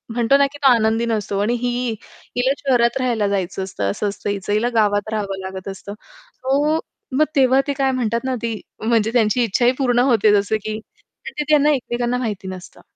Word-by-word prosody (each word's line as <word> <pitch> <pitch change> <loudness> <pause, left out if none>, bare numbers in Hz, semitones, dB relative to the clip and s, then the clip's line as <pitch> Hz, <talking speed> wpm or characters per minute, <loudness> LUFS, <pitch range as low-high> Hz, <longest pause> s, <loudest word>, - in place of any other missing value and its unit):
म्हणतो 240 +3 +4
ना, 280 0 +4
की 290 - -10
तो 265 - +7
आनंदी 225 0 +1
नसतो 205 -3 -1
आणि 235 +4 +1
ही 245 0 -1 0.5
हिला 260 +2 +2 0.2
शहरात 245 0 +3
राहायला 230 -5 +1
जायचं 190 -1 -2
असतं 100 - -3
असं 205 - -2
असतं 205 - -5
हिचं 200 0 -2
हिला 230 +3 +1
गावात 205 -1 +2
राहावं 200 -2 -3
लागत 190 0 -7
असतं. 195 +1 -8 0.4
सो 290 +5 +1 0.4
मग 310 - +5
तेव्हा 265 0 +4
ते 285 - 0
काय 270 -1 +2
म्हणतात 235 -2 0
ना, 260 0 -1
ती 230 -2 -3 0.2
म्हणजे 225 -1 +2
त्यांची 235 +1 +3
इच्छा 235 +3 +1
ही 245 - +6
पूर्ण 245 -3 +2
होते. 220 -3 +4
जसं 205 +1 +2
की 215 0 -3 0.5
ते 300 - -4
त्यांना 300 0 +5
एकमेकांना 245 -1 -2
माहिती 210 -6 -4
नसतं. 185 -1 -9
230 Hz, 195 wpm, -20 LUFS, 205-255 Hz, 0.5 s, तो